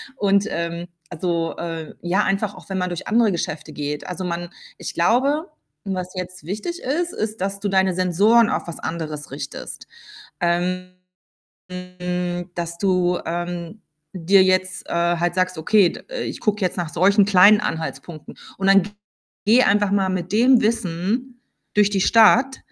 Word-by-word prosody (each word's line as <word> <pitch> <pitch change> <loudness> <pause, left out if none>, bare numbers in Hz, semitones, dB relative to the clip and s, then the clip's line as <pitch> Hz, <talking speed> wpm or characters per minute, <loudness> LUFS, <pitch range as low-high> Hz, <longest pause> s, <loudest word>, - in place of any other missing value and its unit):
Und, 200 -3 +2
ähm, 170 +1 -4 0.2
also, 170 -1 -2
äh 165 -2 -6
ja, 185 +4 +1
einfach 195 +1 -1
auch - - -14
wenn 195 - -2
man 180 - -1
durch 175 - -5
andere 225 -2 +3
Geschäfte 160 -2 -4
geht. 145 0 -4
Also, 180 +1 -5
man 175 0 -4 0.3
ich - - -6
glaube, 275 - +1 0.3
was 185 -2 -4
jetzt 180 -3 -6
wichtig 215 - -4
ist, 340 +7 -1
ist, 215 -2 -4
dass 200 +1 -2
du 205 - -2
deine 190 -1 +2
Sensoren 200 +6 +4
auf - - -2
was 170 - -6
anderes 155 -3 -5
richtest. 140 0 -7 0.5
Ähm, 180 +1 -1 0.7
hm, 180 -1 -4
dass 170 -1 -4
du, 180 -2 +1
ähm, 175 +3 -4 0.3
dir 190 +2 +4
jetzt, 185 0 0
äh, - - -6 0.2
halt 175 +1 -1
sagst: 185 -1 0
„Okay, 190 +3 +4
d - - -10 0.2
ich - - -5
gucke 210 -1 0
jetzt 180 - -1
nach 175 -3 -2
solchen 200 +5 +4
kleinen 200 +1 +6
Anhaltspunkten.“ 160 -3 -5 0.2
Und 195 - -1
dann 195 0 +6
g 205 - -8 0.5
geh 230 +5 +5
einfach 205 0 +2
mal 195 -1 +2
mit 180 -1 -3
dem 245 +3 +5
Wissen 225 +4 -2 0.3
durch 205 -1 +4
die 200 -2 0
Stadt 235 +6 +5
185 Hz, 160 wpm, -22 LUFS, 175-205 Hz, 0.7 s, kleinen